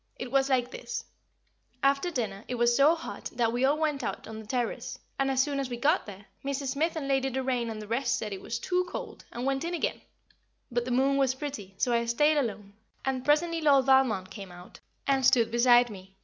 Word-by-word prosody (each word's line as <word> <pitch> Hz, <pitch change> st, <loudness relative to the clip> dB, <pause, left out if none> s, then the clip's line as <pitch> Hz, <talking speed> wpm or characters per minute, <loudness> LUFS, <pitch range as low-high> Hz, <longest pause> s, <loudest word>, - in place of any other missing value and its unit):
It 250 Hz, -1 st, -6 dB
was 270 Hz, 0 st, +3 dB
like 255 Hz, -2 st, +1 dB
this: 455 Hz, +7 st, -5 dB, 0.8 s
After 275 Hz, +5 st, +3 dB
dinner 220 Hz, -, -3 dB
it 250 Hz, -, -3 dB
was 240 Hz, 0 st, +3 dB
so 290 Hz, +5 st, +5 dB
hot 330 Hz, -, -8 dB
that 230 Hz, -2 st, +1 dB
we 245 Hz, +2 st, 0 dB
all 280 Hz, +3 st, +3 dB
went 305 Hz, -3 st, -1 dB
out -, -, -4 dB
on 220 Hz, 0 st, -7 dB
the 220 Hz, -, -11 dB
terrace, 240 Hz, 0 st, -2 dB, 0.2 s
and, 270 Hz, 0 st, +2 dB
as 265 Hz, -1 st, +3 dB
soon 285 Hz, -1 st, -2 dB
as 270 Hz, -2 st, -2 dB
we 240 Hz, -, -4 dB
got 300 Hz, +6 st, +2 dB
there, 200 Hz, 0 st, -10 dB, 0.2 s
Mrs. 275 Hz, 0 st, -2 dB
Smith 310 Hz, +5 st, 0 dB
and 300 Hz, -4 st, -3 dB
Lady 270 Hz, -1 st, +1 dB
Doraine 255 Hz, -2 st, -1 dB
and 220 Hz, -1 st, -5 dB
the 210 Hz, -, -7 dB
rest 245 Hz, +3 st, 0 dB
said 210 Hz, -2 st, -4 dB
it 190 Hz, -, -7 dB
was 230 Hz, -, -3 dB
too 360 Hz, +8 st, 0 dB
cold, -, -, -7 dB
and 240 Hz, +2 st, -4 dB
went 270 Hz, +1 st, 0 dB
in 345 Hz, +1 st, -2 dB
again; -, -, -2 dB, 0.7 s
but 240 Hz, 0 st, 0 dB
the -, -, -4 dB
moon 265 Hz, +3 st, +2 dB
was 265 Hz, -2 st, +2 dB
pretty, 260 Hz, -9 st, -6 dB
so 245 Hz, -, +1 dB
I 235 Hz, 0 st, +2 dB
stayed 295 Hz, +6 st, +3 dB
alone, 210 Hz, -6 st, -2 dB, 0.3 s
and 260 Hz, -1 st, -1 dB
presently 330 Hz, +3 st, +2 dB
Lord 280 Hz, -4 st, +5 dB
Valmond 255 Hz, -8 st, +3 dB
came 195 Hz, -4 st, -8 dB
out, 175 Hz, 0 st, -13 dB, 0.3 s
and 270 Hz, -1 st, +2 dB
stood 235 Hz, -2 st, +4 dB
beside 240 Hz, 0 st, +5 dB
me. 190 Hz, -1 st, -12 dB
260 Hz, 225 wpm, -28 LUFS, 235-280 Hz, 0.8 s, so